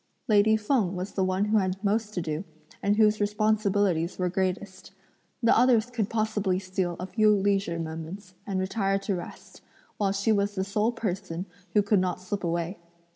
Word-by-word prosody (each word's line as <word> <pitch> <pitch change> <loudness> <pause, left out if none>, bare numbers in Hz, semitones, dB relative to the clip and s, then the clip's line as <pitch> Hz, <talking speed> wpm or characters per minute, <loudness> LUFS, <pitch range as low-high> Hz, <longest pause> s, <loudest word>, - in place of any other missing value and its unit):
Lady 215 0 +5
Feng 210 -4 +1
was 185 +3 -4
the 190 - 0
one 185 +2 +1
who 215 +1 +3
had 185 -1 -1
most 215 +1 0
to 175 - -1
do, 155 +1 -3 0.4
and 205 +1 +2
whose 215 -1 +3
responsibilities 205 -4 +1
were 180 -1 0
greatest. 190 +1 -3 0.5
The 230 - +5
others 240 -1 +4
could 225 -5 -1
possibly 215 -4 0
steal 185 -2 -2
a 180 - -3
few 215 +2 +3
leisure 195 -3 +1
moments 165 +4 -6
and 195 -2 -1
retire 195 +1 0
to 195 +1 -2
rest, 175 - -8 0.4
while 200 -2 +1
she 200 +3 +1
was 205 -1 +1
the 190 - 0
sole 210 +3 0
person 190 -6 -4 0.3
who 210 - +5
could 205 0 +3
not 185 -1 -1
slip 200 +1 -4
away. 170 +2 -2
200 Hz, 180 wpm, -27 LUFS, 185-210 Hz, 0.5 s, Lady